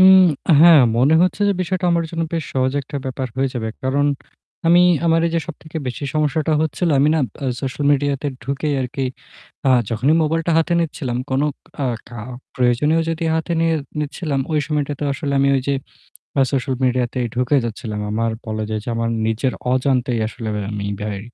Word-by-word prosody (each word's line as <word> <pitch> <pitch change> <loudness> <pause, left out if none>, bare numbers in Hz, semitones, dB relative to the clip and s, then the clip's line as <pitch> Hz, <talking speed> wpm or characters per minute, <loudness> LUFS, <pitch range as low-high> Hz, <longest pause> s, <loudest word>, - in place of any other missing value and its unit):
উম 190 0 +9 0.4
হ্যাঁ, 165 -3 +9 0.2
মনে 140 +6 +4
হচ্ছে 185 +3 0
যে - - +3
বিষয়টা 185 +1 -2
আমার 170 -1 +1
জন্য 165 -1 -2
বেশ 165 -2 -1
সহজ 130 0 +1
একটা 140 +2 -7
ব্যাপার 130 0 -3
হয়ে 135 0 +1
যাবে। 110 -3 -2
কারণ 140 +2 +1 0.6
আমি, 175 +2 +6 0.2
আমার 165 0 +4
এই 170 - -1
যে 165 - +2
সবথেকে 160 -1 -9
বেশি 125 +3 -4
সমস্যাটা 155 +1 +1
হচ্ছিল, 160 +3 0
আমি 140 +2 +4
না 160 - +2 0.2
অ্যা 140 - -2
social 135 +2 -3
media 145 0 +1
তে 145 - 0 0.2
ঢুকেই 140 +3 -1
আর 130 - -1
কি 135 -2 -1 0.6
আ - - +5 0.2
যখনই 125 +7 +2
mobile 165 +1 0
টা 170 - +2
হাতে 165 +2 +1
নিচ্ছিলাম, 135 -6 -2
কোন 130 +1 +1 0.4
আ - - +1 0.2
কা 120 -1 -8 0.4
প্রয়োজনীয় 130 +6 +2
যদি 165 0 -2
হাতে 160 +2 -1
নিয়ে 165 0 +2 0.3
নিচ্ছিলাম, 150 -1 -2
ওই 155 - +2
সময়টাতেও 145 -2 -2
আসলে 140 0 -3
আমি 140 - +3
ওই - - +1
যে 140 - +2 0.7
আ - - +6
social 130 -1 0
মিডিয়াতেই 125 -1 0
ঢুকে 125 +3 +2
যাচ্ছিলাম। 110 -2 -4
আমার 115 +1 0 0.2
বলা 110 0 -3
যায় 110 - -1
যে - - -7
আমার 115 0 0 0.2
নিজের 115 +4 0 0.2
অজান্তেই 130 -2 +1
আসলে 110 0 -6 0.2
আমি 100 -1 -3 0.2
ভাই 105 -2 -3
140 Hz, 190 wpm, -20 LUFS, 125-160 Hz, 0.7 s, উম